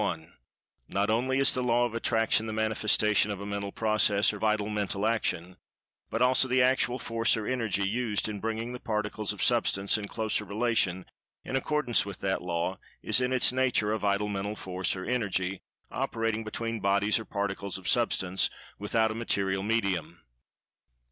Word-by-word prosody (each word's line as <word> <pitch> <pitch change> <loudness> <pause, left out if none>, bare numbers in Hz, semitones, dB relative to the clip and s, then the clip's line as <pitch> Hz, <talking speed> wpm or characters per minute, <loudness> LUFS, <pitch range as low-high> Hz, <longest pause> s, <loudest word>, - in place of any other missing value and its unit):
—Not 100 +2 0
only 130 +4 +1
is 135 -1 +5
the 130 - 0
Law 120 0 +2
of 120 - -4
Attraction 115 -1 +1
the 110 - -4
manifestation 110 -2 +2
of 100 -2 -4
a 100 - -6
Mental 100 -1 -4
Process, 110 -2 +2
or 105 - -7
Vital 105 -1 +1
Mental 105 -1 -1
Action; 90 -6 -1 0.5
but 115 - +1
also 130 +1 +4
the 130 +1 +2
actual 130 -1 +2
Force 115 -1 +1
or 110 - -4
Energy 110 -6 0
used 110 -1 -1
in 105 -2 -5
bringing 115 +3 -3
the 125 - -6
Particles 105 -2 -2
of - - -3
Substance 100 +2 +2
in 105 - -6
closer 110 0 -1
relation, 100 -3 0 0.4
in 130 - -3
accordance 140 -2 +1
with 100 -2 -7
that 95 -1 0
Law, 90 +2 -2 0.2
is 130 - +3
in 125 0 0
its 130 -1 +3
nature 125 -5 +1
a 110 - -1
Vital 100 0 +1
Mental 100 +1 -3
Force 95 -2 -2
or 95 - -6
Energy, 100 -6 -1 0.3
operating 115 -1 -1
between 115 +1 -3
bodies 100 +2 +2
or 110 - -7
particles 100 -1 -3
of 95 - -8
Substance, 95 0 +2 0.3
without 110 +2 +1
a - - -3
material 100 -4 -1
medium. 95 -6 -1
105 Hz, 170 wpm, -28 LUFS, 100-115 Hz, 0.5 s, is